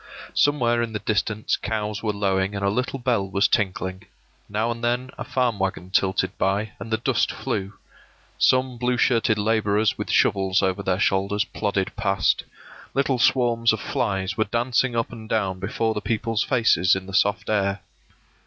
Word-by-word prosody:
Somewhere 120 -5 +2
in 115 -1 -3
the - - -1
distance 110 0 0
cows 105 -1 -3
were 110 - 0
lowing 100 -1 0
and 100 0 -2
a 100 - +2
little 125 +5 -2
bell 120 -6 0
was 100 +2 +2
tinkling; 95 -2 -1 0.4
now 110 +3 0
and 115 0 -6
then 125 +2 -1
a - - -5
farm 125 -5 0
wagon 95 -1 -3
tilted 95 0 +1
by, 100 +3 0
and - - -7
the 110 - +1
dust - - +1
flew; 95 +1 -3 0.7
some 130 -1 +2
blue 125 0 +1
shirted 115 -3 +2
laborers 105 0 +1
with - - -4
shovels 95 -1 +2
over 95 +1 0
their 95 -2 0
shoulders 100 0 +1
plodded 100 -2 -2
past; 100 -3 +1 0.5
little 135 -2 +1
swarms 120 -2 +3
of 110 - -3
flies 100 -6 -2
were 110 - +1
dancing 120 +3 0
up 115 - -1
and 110 -2 -10
down 95 -4 0
before 110 +4 -1
the 105 - -4
peoples' 110 +1 -1
faces 110 - +3
in 95 0 -5
the 95 - -10
soft 100 +2 +1
air. 100 -2 0
105 Hz, 170 wpm, -24 LUFS, 95-115 Hz, 0.7 s, swarms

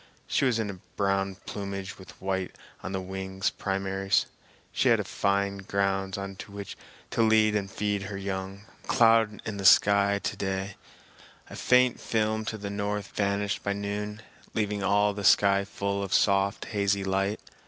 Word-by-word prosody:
She - - +1
was 125 -3 +2
in 100 -5 -4
brown 95 -1 0
plumage 100 -1 -5
with 95 - -13
white 95 -1 -2 0.3
on 95 - -5
the 95 - -2
wing 95 +1 -6 0.2
primaries. 95 0 0 0.5
She - - +2
had - - +3
fine 100 0 0
grounds 95 0 -1
on 100 -1 -6
which 100 -1 -8 0.4
to - - +1
lead 110 -1 +4
and 100 -2 -1
feed 105 0 -1
her 100 - -5
young. 95 0 -4
Not - - -20 0.2
a - - -17
cloud 115 -2 +4
in 105 -2 -4
the 100 - -5
sky 100 0 +5
to - - -2
day; 95 0 -3 0.8
a - - -7
faint 125 -1 +3
film 110 -1 0
to 110 - -3
the 100 -1 -5
north 100 0 -3
vanished 100 0 -1
by 100 - 0
noon, 105 +1 -4 0.3
leaving 105 -2 -1
all 100 +1 +3
the 100 0 -6
sky 100 +1 +5
full 100 0 -2
of 100 -1 0
soft, 100 -1 +2
hazy 100 -2 0
light. 95 +2 0
100 Hz, 165 wpm, -28 LUFS, 95-105 Hz, 0.8 s, sky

